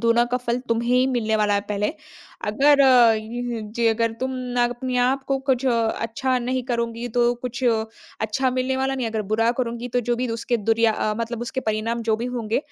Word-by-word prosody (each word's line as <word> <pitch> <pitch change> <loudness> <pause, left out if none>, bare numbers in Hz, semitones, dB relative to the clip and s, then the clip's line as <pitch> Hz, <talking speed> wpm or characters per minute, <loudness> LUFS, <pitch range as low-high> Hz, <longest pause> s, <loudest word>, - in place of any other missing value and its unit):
दोनों 235 +1 +3
का 245 +1 -1
फल 240 -1 -2
तुम्हें 230 +1 0
ही 255 +1 +4
मिलने 225 -4 0
वाला 210 -1 +2
है 200 - +2
पहले। 210 +6 -1 0.5
अगर 280 +7 +4
उम, 235 -3 +3
जे 235 0 +2
अगर 225 0 +1
तुम 260 0 -1
ना 250 -1 -1
अपने 245 +1 -2
आप 260 +2 +2
को 275 -1 +1
कुछ 265 -1 0
अच्छा 230 +2 0
नहीं 255 +1 -2
करुँगी, 235 -1 -2
तो 240 +1 +2
कुछ 245 +1 -6 0.6
अच्छा 220 +5 0
मिलने 255 +1 -1
वाला 265 0 0
नहीं 255 -3 -2
है। - - -3
अगर 220 -1 -2
बुरा 225 +1 +3
करुँगी, 235 -1 -2
तो 245 +1 0
जो 240 0 -1
भी 250 +1 -2
उसके 230 +1 -1
दुर 225 +2 +1
अ, 215 -1 0
मतलब 230 0 -3
उसके 260 +2 -3
परिणाम 225 +1 -2
जो 220 -1 +1
भी 230 - -4
होंगे 235 -3 -1
240 Hz, 210 wpm, -23 LUFS, 225-255 Hz, 0.6 s, ही